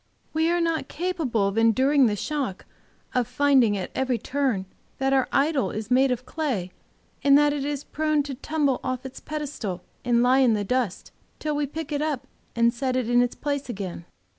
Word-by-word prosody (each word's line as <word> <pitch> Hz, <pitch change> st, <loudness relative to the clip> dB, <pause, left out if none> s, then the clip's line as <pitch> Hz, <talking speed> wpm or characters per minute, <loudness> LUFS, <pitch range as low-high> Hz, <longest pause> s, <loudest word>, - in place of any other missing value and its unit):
We 320 Hz, +1 st, +2 dB
are 345 Hz, 0 st, +2 dB
not 330 Hz, -2 st, 0 dB
capable 310 Hz, -, -1 dB
of 200 Hz, +3 st, 0 dB
enduring 260 Hz, +4 st, +4 dB
the 210 Hz, -, 0 dB
shock 270 Hz, -4 st, -3 dB, 0.5 s
of 250 Hz, -3 st, +1 dB
finding 265 Hz, -7 st, +3 dB
at 185 Hz, -, -5 dB
every 260 Hz, -2 st, 0 dB
turn 255 Hz, -5 st, -1 dB, 0.3 s
that 270 Hz, 0 st, +1 dB
our 265 Hz, -1 st, +3 dB
idol 280 Hz, -1 st, +2 dB
is 215 Hz, +1 st, -5 dB
made 265 Hz, +2 st, +5 dB
of 250 Hz, 0 st, -2 dB
clay, 250 Hz, -, -2 dB, 0.5 s
and 280 Hz, 0 st, +7 dB
that 295 Hz, 0 st, +4 dB
it 285 Hz, -2 st, -2 dB
is 290 Hz, 0 st, -3 dB
prone 310 Hz, -1 st, 0 dB
to 280 Hz, -1 st, -5 dB
tumble 285 Hz, 0 st, 0 dB
off 255 Hz, 0 st, -3 dB
its 265 Hz, -, -8 dB
pedestal 290 Hz, -, -5 dB, 0.2 s
and 240 Hz, -1 st, +3 dB
lie 255 Hz, +2 st, +4 dB
in 245 Hz, -4 st, +4 dB
the 205 Hz, -, -1 dB
dust, 235 Hz, -3 st, -2 dB, 0.3 s
till 305 Hz, -1 st, -2 dB
we 290 Hz, -1 st, 0 dB
pick 310 Hz, +1 st, -6 dB
it 290 Hz, 0 st, -1 dB
up 290 Hz, -4 st, -2 dB, 0.3 s
and 235 Hz, 0 st, +3 dB
set 255 Hz, +1 st, -1 dB
it 245 Hz, -2 st, 0 dB
in 245 Hz, 0 st, +5 dB
its 245 Hz, 0 st, 0 dB
place 285 Hz, -2 st, -3 dB
again. 190 Hz, -6 st, -5 dB
265 Hz, 195 wpm, -25 LUFS, 235-290 Hz, 0.5 s, and